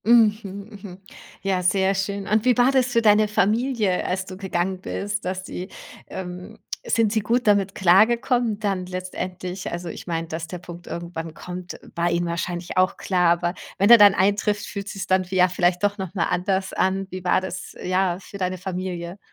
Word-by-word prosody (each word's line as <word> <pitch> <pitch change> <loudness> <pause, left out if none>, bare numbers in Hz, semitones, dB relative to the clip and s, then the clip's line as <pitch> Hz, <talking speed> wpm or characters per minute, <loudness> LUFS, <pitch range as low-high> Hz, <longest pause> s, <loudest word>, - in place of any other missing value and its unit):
Mhm. 225 -2 +5 0.4
Mhm. 190 -2 -10 0.4
Ja, 190 -2 +1
sehr 190 +2 +2
schön. 195 0 -2
Und 215 +1 +2
wie 250 -2 +4
war 245 +2 +5
das 260 -2 +3
für 235 -2 +2
deine 215 0 +5
Familie, 215 -1 +1
als 185 +1 -1
du 185 - -8
gegangen 190 -1 -2
bist, 205 +1 -3
dass 185 0 -3
sie, 185 +1 -6 0.4
ähm 180 +3 -7 0.3
sind 225 -2 +2
sie 220 - +2
gut 235 +4 0
damit 200 -2 +3
klargekommen 225 +4 +3
dann 195 -4 -2
letztendlich? 185 0 -5
Also, 175 0 -5
ich - - -8
mein, 165 -1 -2
dass 160 +1 -4
der 180 - -6
Punkt 175 0 -11
irgendwann 170 -2 -6
kommt, 180 0 -7
war 170 0 0
ihnen 175 0 0
wahrscheinlich 175 +1 -3
auch 185 +1 +2
klar. 180 -2 +2
Aber 175 0 -2 0.2
wenn 200 +4 +4
er 235 - +10
dann 205 -1 +8
eintrifft, 205 +1 +1
fühlt 200 -1 -6
sich's 195 -2 -5
dann 185 0 +2
vie 185 +1 -6
ja, 180 0 +6
vielleicht 180 0 +1
doch 205 0 +1
noch 190 0 -5
mal 170 - +1
anders 190 +1 0
an. 190 +1 +1
Wie 185 0 -6
war 180 - +3
das, 190 0 -7
ja, 185 -1 +1
für 200 +1 -11
deine 185 0 -1
Familie? 180 -1 -5
190 Hz, 195 wpm, -23 LUFS, 180-205 Hz, 0.4 s, er